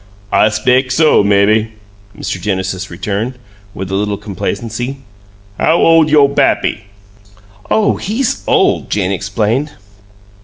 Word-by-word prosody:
"I 110 - +4
speck 125 +5 +1
so, 150 -2 +4
mebbe," 100 +2 +3 0.5
Mr. 90 - -4
Genesis 95 -1 -3
returned, 105 +7 -4 0.4
with 95 0 -6
a - - -3
little 100 +1 -1
complacency. 115 +5 -4 0.6
"How 160 - +3
ole 165 -2 +4
yo' 145 -2 +5
pappy?" 140 -7 0 0.8
"Oh, 215 -1 +2
he's 225 +6 -2
OLD!" - - +2
Jane 95 -2 0
explained. 105 +9 -1
110 Hz, 115 wpm, -14 LUFS, 100-140 Hz, 0.8 s, yo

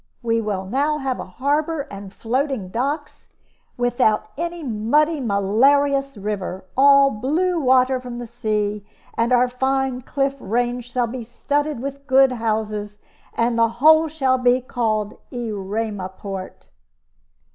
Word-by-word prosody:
We 230 -1 +1
will 200 -3 -3
now 285 +9 0
have 270 -3 -2
a - - -5
harbor 290 - -1
and 195 -1 -8
floating 245 -2 -2
docks, 285 - -4 0.4
without 245 -3 +1
any 340 +1 -4
muddy, 285 +7 +1
malarious 275 +6 +2
river 195 -2 -4
all 275 0 +6
blue 330 +11 0
water 260 -1 +3
from 250 -1 -7
the 240 - -5
sea; 215 -3 -2 0.3
and 230 +2 +1
our 250 0 +4
fine 265 0 -1
cliff 275 +2 -1
range 245 +2 -2
shall 245 0 +1
be 235 +1 -6
studded 290 +3 -2
with 275 +1 -6
good 265 -1 +5
houses. 215 -3 -2 0.4
And 230 0 +1
the 230 0 +4
whole 315 +4 +6
shall 270 -4 +1
be 250 0 +3
called 220 -4 -2
'Erema 210 -4 -3
port.'" 195 -2 -7
245 Hz, 135 wpm, -21 LUFS, 215-275 Hz, 0.4 s, all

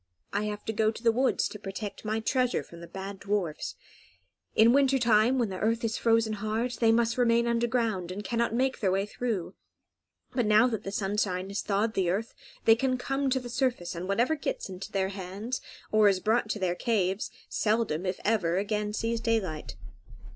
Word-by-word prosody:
"I 205 +1 0
have 210 0 -5
to 220 - -2
go 215 0 +2
to 225 +2 -6
the 230 - +5
woods 255 +3 +1
to 210 - -9
protect 195 +1 -6
my 215 +1 -1
treasure 250 +2 +1
from 170 - -13
the 170 - -9
bad 195 +1 -7
dwarfs. 195 -7 -2 0.8
In 225 +2 +6
winter 270 -1 +4
time 235 +1 +4
when 235 -4 +1
the 185 -1 -5
earth 225 +2 +1
is 225 -1 0
frozen 225 -1 +3
hard, 220 +4 -1
they 225 -1 +5
must 235 +2 +2
remain 235 -1 +4
underground, 230 -6 0
and 200 +3 -5
cannot 235 +3 0
make 260 +3 0
their 195 -5 +1
way 195 +1 +1
through; 210 -5 -3 0.8
but 245 -4 +1
now 215 +2 +6
that 220 -4 -1
the 195 - -3
sunshine 195 -2 -1
has 200 - -2
thawed 210 +2 0
the 185 -4 +1
earth 210 +6 -2 0.3
they 225 - +8
can 255 +1 0
come 270 +2 -1
to 260 0 +2
the 245 - -8
surface, 240 -8 -1
and 175 +1 -5
whatever 235 +10 +2
gets 285 -8 -3
into 185 +1 -7
their 190 -1 0
hands, 200 +6 -5 0.3
or 215 -1 +6
is 190 -2 +1
brought 220 +2 +1
to 215 - -1
their 185 -3 0
caves, 195 -1 0 0.2
seldom, 210 -7 0
if 185 - -2
ever, 185 -6 +2
again 210 +1 -1
sees 230 +1 -1
daylight." 185 - -1
215 Hz, 195 wpm, -28 LUFS, 195-235 Hz, 0.8 s, they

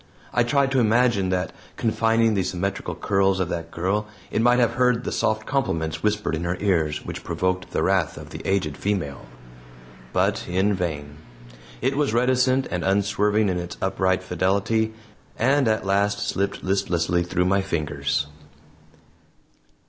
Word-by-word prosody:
I 120 - +3
tried 135 +3 +2
to 135 - +3
imagine 115 -4 +3
that, 90 -1 -1 0.2
confining 115 0 +2
the 100 - +1
symmetrical 90 -1 -3
curls 95 +1 +1
of 90 -2 -1
that 85 -1 -4
girl, 95 +6 -1 0.2
it 110 - +1
might 120 +1 +4
have 120 -2 +3
heard 125 -2 +2
the - - -3
soft 110 0 0
compliments 80 - -1
whispered 105 -3 0
in 80 +2 -2
her 90 +1 -1
ears 80 -7 0
which - - -6
provoked 90 0 -1
the - - -1
wrath - - +1
of - - -10
the - - -7
aged 90 -7 0
female. 85 -12 -3 0.8
But - - 0
in 95 +3 +1
vain. 75 -6 -4 0.7
It 135 - +1
was 140 -5 +1
reticent 130 +2 +3
and 90 -1 -2
unswerving 105 +2 +2
in 90 -2 0
its 85 0 -6
upright 95 -1 0
fidelity, 100 +5 0 0.4
and 135 +2 +3
at 110 -3 +1
last 100 +1 +1
slipped 100 +2 -2
listlessly 90 -3 +1
through 90 +1 0
my 100 +2 +3
fingers. 75 -7 -1
100 Hz, 155 wpm, -24 LUFS, 90-110 Hz, 0.8 s, might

